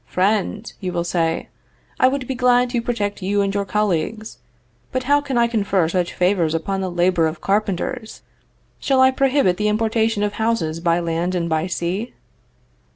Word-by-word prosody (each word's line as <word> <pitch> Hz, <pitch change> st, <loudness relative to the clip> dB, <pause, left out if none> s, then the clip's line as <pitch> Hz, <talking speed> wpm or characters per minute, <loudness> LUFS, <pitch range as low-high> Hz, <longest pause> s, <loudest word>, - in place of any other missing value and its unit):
"Friend," 205 Hz, +3 st, 0 dB
you 185 Hz, -3 st, -3 dB
will 170 Hz, -1 st, -1 dB
say, 165 Hz, -1 st, -1 dB, 0.5 s
"I 255 Hz, -, +6 dB
would 265 Hz, 0 st, -1 dB
be 265 Hz, -, -2 dB
glad 250 Hz, -1 st, +3 dB
to 240 Hz, -, 0 dB
protect 210 Hz, -4 st, -2 dB
you 200 Hz, +2 st, +1 dB
and 195 Hz, 0 st, -1 dB
your 200 Hz, 0 st, -1 dB
colleagues; 210 Hz, +2 st, -2 dB, 0.5 s
but 255 Hz, 0 st, -2 dB
how 285 Hz, +3 st, +3 dB
can 275 Hz, -3 st, -3 dB
I 235 Hz, -, +4 dB
confer 200 Hz, -7 st, +1 dB
such 175 Hz, +1 st, -1 dB
favors 180 Hz, -3 st, +1 dB
upon 190 Hz, +4 st, -2 dB
the 190 Hz, -, -2 dB
labor 175 Hz, -1 st, +2 dB
of 160 Hz, 0 st, -5 dB
carpenters? 210 Hz, +4 st, -2 dB, 0.6 s
Shall 270 Hz, -1 st, +1 dB
I 260 Hz, 0 st, +6 dB
prohibit 260 Hz, -8 st, +2 dB
the 210 Hz, -, 0 dB
importation 220 Hz, 0 st, +1 dB
of 205 Hz, 0 st, -1 dB
houses 175 Hz, -9 st, 0 dB
by 170 Hz, 0 st, +1 dB
land 170 Hz, +2 st, -1 dB
and 170 Hz, -1 st, -1 dB
by 160 Hz, +1 st, 0 dB
sea?" 185 Hz, +6 st, -3 dB
200 Hz, 175 wpm, -21 LUFS, 175-230 Hz, 0.6 s, I